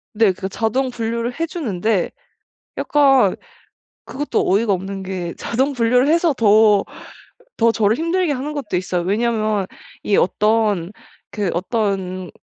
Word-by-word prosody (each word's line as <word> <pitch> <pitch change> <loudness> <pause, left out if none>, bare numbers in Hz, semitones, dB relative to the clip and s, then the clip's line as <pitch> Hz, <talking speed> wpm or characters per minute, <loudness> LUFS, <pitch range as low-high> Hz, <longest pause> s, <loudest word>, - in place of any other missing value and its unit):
네 215 -2 +4
그 190 +1 -5
자동 235 +6 -1
분류를 235 +2 -3
해 330 - 0
주는데 220 - -1 0.7
약간 270 -9 +3 0.7
그것도 290 +2 -2
어이가 205 +2 +2
없는 195 +1 -4
게 185 -2 -5
자동 265 +5 -1
분류를 250 +1 +2
해서 335 0 +3
더 215 -4 +4 0.7
더 230 0 +3
저를 220 +1 +2
힘들게 335 +1 0
하는 285 +2 -3
것도 275 -11 -3
있어요. 180 -1 -2
왜냐하면 215 0 0 0.3
이 205 - +1
어떤 210 -3 +1 0.4
그 205 -3 -2
어떤 185 -2 -2
220 Hz, 255 characters per minute, -19 LUFS, 195-255 Hz, 0.7 s, 네